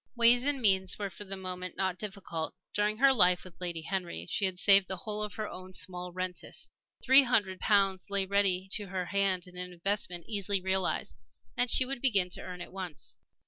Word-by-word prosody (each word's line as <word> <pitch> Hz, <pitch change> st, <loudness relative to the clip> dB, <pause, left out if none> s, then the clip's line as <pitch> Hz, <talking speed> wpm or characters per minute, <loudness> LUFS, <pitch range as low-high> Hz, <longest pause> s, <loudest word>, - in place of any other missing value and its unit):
Ways 240 Hz, +1 st, +5 dB
and 290 Hz, -1 st, 0 dB
means 190 Hz, -5 st, +3 dB
were 200 Hz, -2 st, -4 dB
for 205 Hz, +4 st, -9 dB
the 195 Hz, 0 st, -6 dB
moment 185 Hz, -1 st, -6 dB
not 190 Hz, -1 st, -1 dB
difficult. 190 Hz, -6 st, -5 dB, 0.2 s
During 210 Hz, +1 st, 0 dB
her 270 Hz, +2 st, +5 dB
life 180 Hz, -6 st, +4 dB
with 185 Hz, -1 st, -14 dB
Lady 170 Hz, -2 st, -4 dB
Henry 175 Hz, -, -4 dB
she 200 Hz, -, 0 dB
had 185 Hz, -1 st, -1 dB
saved 195 Hz, 0 st, +5 dB
the 190 Hz, -, -3 dB
whole 210 Hz, +3 st, -4 dB
of 210 Hz, -3 st, -4 dB
her 215 Hz, 0 st, -3 dB
own 185 Hz, -1 st, -10 dB
small 180 Hz, -1 st, 0 dB
rentes. 185 Hz, 0 st, -5 dB, 0.3 s
Three 265 Hz, +2 st, +9 dB
hundred 205 Hz, -8 st, +1 dB
pounds 195 Hz, -2 st, +2 dB
lay 200 Hz, -1 st, 0 dB
ready 190 Hz, -1 st, +1 dB
to 205 Hz, -1 st, -1 dB
her 185 Hz, -1 st, -3 dB
hand 195 Hz, -2 st, 0 dB
in 180 Hz, 0 st, -15 dB
an 180 Hz, 0 st, -4 dB
investment 180 Hz, -1 st, -3 dB
easily 200 Hz, -2 st, -1 dB
realized. 190 Hz, 0 st, -1 dB, 0.4 s
And 245 Hz, -, +1 dB
she 255 Hz, -, +4 dB
would 265 Hz, -1 st, -5 dB
begin 200 Hz, -9 st, +3 dB
to -, -, -2 dB
earn 180 Hz, -1 st, -8 dB
at 175 Hz, -, -9 dB
once. 175 Hz, -10 st, -6 dB
190 Hz, 205 wpm, -30 LUFS, 180-205 Hz, 0.4 s, Three